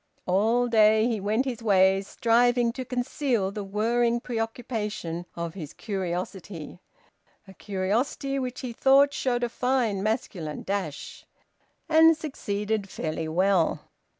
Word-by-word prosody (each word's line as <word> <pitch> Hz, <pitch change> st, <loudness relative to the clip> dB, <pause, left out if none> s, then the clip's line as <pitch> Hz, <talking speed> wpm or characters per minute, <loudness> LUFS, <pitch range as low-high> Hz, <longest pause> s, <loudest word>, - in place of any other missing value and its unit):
All 225 Hz, +7 st, +2 dB
day 220 Hz, -1 st, +5 dB
he 230 Hz, -3 st, -1 dB
went 215 Hz, +6 st, 0 dB
his 240 Hz, -4 st, -4 dB
ways, 195 Hz, -2 st, +3 dB
striving 240 Hz, +1 st, +2 dB
to 255 Hz, -, -5 dB
conceal 245 Hz, -4 st, -1 dB
the 205 Hz, 0 st, -5 dB
whirring 230 Hz, +4 st, +1 dB
preoccupation 220 Hz, -7 st, -4 dB
of 170 Hz, -1 st, -4 dB
his 160 Hz, -6 st, -8 dB
curiosity 180 Hz, -3 st, -5 dB, 0.7 s
(a 190 Hz, -, -12 dB
curiosity 215 Hz, +9 st, -2 dB
which 255 Hz, -1 st, -4 dB
he 250 Hz, -2 st, -5 dB
thought 275 Hz, +3 st, +4 dB
showed 245 Hz, -2 st, -1 dB
a -, -, +2 dB
fine 245 Hz, -5 st, 0 dB
masculine 195 Hz, -, -3 dB
dash), 195 Hz, -7 st, -5 dB, 0.6 s
and 320 Hz, 0 st, +6 dB
succeeded 210 Hz, -8 st, -3 dB
fairly 160 Hz, -1 st, -3 dB
well. 180 Hz, +1 st, +1 dB
215 Hz, 125 wpm, -26 LUFS, 190-245 Hz, 0.7 s, and